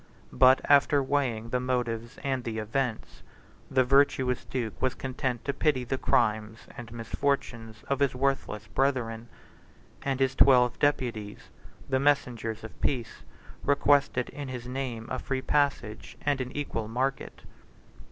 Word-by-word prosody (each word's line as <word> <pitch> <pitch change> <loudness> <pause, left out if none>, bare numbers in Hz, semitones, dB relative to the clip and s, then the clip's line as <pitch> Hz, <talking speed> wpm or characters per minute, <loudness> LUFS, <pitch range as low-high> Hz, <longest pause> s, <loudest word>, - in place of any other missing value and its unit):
But, 130 0 +6
after 145 0 +4
weighing 130 -5 -1
the 125 - 0
motives 120 -2 -2
and 130 -2 -1
the 115 -2 -4
events, 110 +2 -3 0.5
the 130 - +3
virtuous 130 -1 +2
duke 115 -8 -4
was 130 -1 +1
content 130 -2 -3
to 140 - 0
pity 140 -2 +1
the 130 +2 -3
crimes 110 -1 0
and 115 -1 -9
misfortunes 115 -2 -3
of 140 - 0
his 140 -2 +2
worthless 130 -5 -1
brethren; 120 -2 -1 0.7
and 135 -1 -2
his 135 -1 +2
twelve 125 -2 +5
deputies, 115 -8 -1 0.4
the 130 -1 +1
messengers 125 -6 0
of 110 - -11
peace, 120 -5 -2 0.4
requested 140 -3 +2
in 145 -1 -7
his 125 -2 -6
name 125 -3 -4
a 130 - -2
free 130 -1 -3
passage 140 -7 -1
and 145 -2 +1
an 125 0 -4
equal 115 -6 -3
market. 130 +4 -3
125 Hz, 140 wpm, -28 LUFS, 115-135 Hz, 0.7 s, But